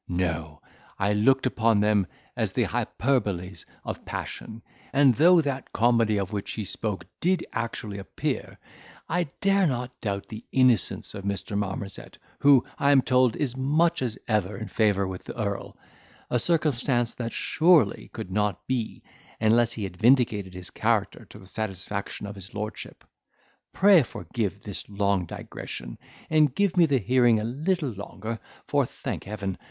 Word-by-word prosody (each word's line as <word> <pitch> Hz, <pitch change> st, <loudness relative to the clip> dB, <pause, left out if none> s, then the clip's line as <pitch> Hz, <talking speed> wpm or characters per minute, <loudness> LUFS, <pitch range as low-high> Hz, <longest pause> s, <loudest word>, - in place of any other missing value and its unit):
No, 80 Hz, -4 st, -2 dB, 0.3 s
I 100 Hz, +1 st, +1 dB
looked 130 Hz, +6 st, +3 dB
upon 115 Hz, -4 st, +2 dB
them 105 Hz, -3 st, +3 dB, 0.3 s
as -, -, -1 dB
the -, -, +2 dB
hyperboles 100 Hz, -8 st, -1 dB, 0.2 s
of -, -, -5 dB
passion; 115 Hz, 0 st, -6 dB, 0.3 s
and 140 Hz, -2 st, +5 dB
though 170 Hz, +7 st, +6 dB
that 140 Hz, -3 st, -4 dB
comedy 115 Hz, -2 st, +3 dB
of 100 Hz, +1 st, -3 dB
which 100 Hz, -1 st, -3 dB
he 110 Hz, -, -3 dB
spoke 100 Hz, -2 st, -3 dB
did 180 Hz, 0 st, +1 dB
actually 115 Hz, -3 st, -4 dB
appear, 95 Hz, -, -4 dB, 0.5 s
I 175 Hz, +1 st, 0 dB, 0.2 s
dare 195 Hz, -1 st, +4 dB
not 125 Hz, -2 st, -2 dB
doubt 100 Hz, -2 st, -2 dB
the 110 Hz, +1 st, -9 dB
innocence 130 Hz, -6 st, +2 dB
of 100 Hz, -, -7 dB
Mr. 100 Hz, +1 st, -3 dB
Marmozet, 100 Hz, -1 st, -4 dB, 0.2 s
who, 140 Hz, -3 st, +6 dB
I 140 Hz, -, +4 dB
am 135 Hz, -2 st, +5 dB
told, 125 Hz, -2 st, +3 dB
is 145 Hz, -5 st, -1 dB
as -, -, -11 dB
much 155 Hz, +5 st, +2 dB
as 120 Hz, -4 st, -2 dB
ever 105 Hz, -3 st, 0 dB
in 110 Hz, -2 st, -6 dB
favour 100 Hz, -2 st, +2 dB
with 95 Hz, -1 st, -6 dB
the -, -, -8 dB
earl; 100 Hz, -2 st, -3 dB, 0.5 s
a 125 Hz, -, +3 dB
circumstance 130 Hz, -6 st, +1 dB
that, 115 Hz, -2 st, -4 dB
surely, 155 Hz, -, +3 dB
could 95 Hz, -, -7 dB
not 105 Hz, +1 st, -1 dB
be, 120 Hz, -3 st, -3 dB, 0.4 s
unless 115 Hz, +2 st, +3 dB
he 110 Hz, -, -5 dB
had 90 Hz, -2 st, -6 dB
vindicated 110 Hz, -6 st, +3 dB
his 90 Hz, 0 st, -7 dB
character 110 Hz, -3 st, 0 dB
to -, -, -12 dB
the 100 Hz, -, -14 dB
satisfaction 100 Hz, 0 st, -4 dB
of 100 Hz, -, -6 dB
his 95 Hz, 0 st, -11 dB
lordship. 105 Hz, +1 st, -6 dB, 0.7 s
Pray 195 Hz, -3 st, +6 dB
forgive 105 Hz, -5 st, -4 dB
this 100 Hz, -1 st, -5 dB
long 100 Hz, -3 st, 0 dB
digression, -, -, -7 dB, 0.3 s
and 150 Hz, -4 st, +3 dB
give 200 Hz, -3 st, +2 dB
me 170 Hz, -2 st, +6 dB
the 140 Hz, -2 st, +3 dB
hearing 120 Hz, 0 st, +4 dB
a -, -, -3 dB
little 150 Hz, -, -1 dB
longer; 110 Hz, +2 st, -6 dB, 0.3 s
for, -, -, +3 dB
thank -, -, -6 dB
heaven! 100 Hz, -2 st, -4 dB
110 Hz, 160 wpm, -26 LUFS, 100-130 Hz, 0.7 s, though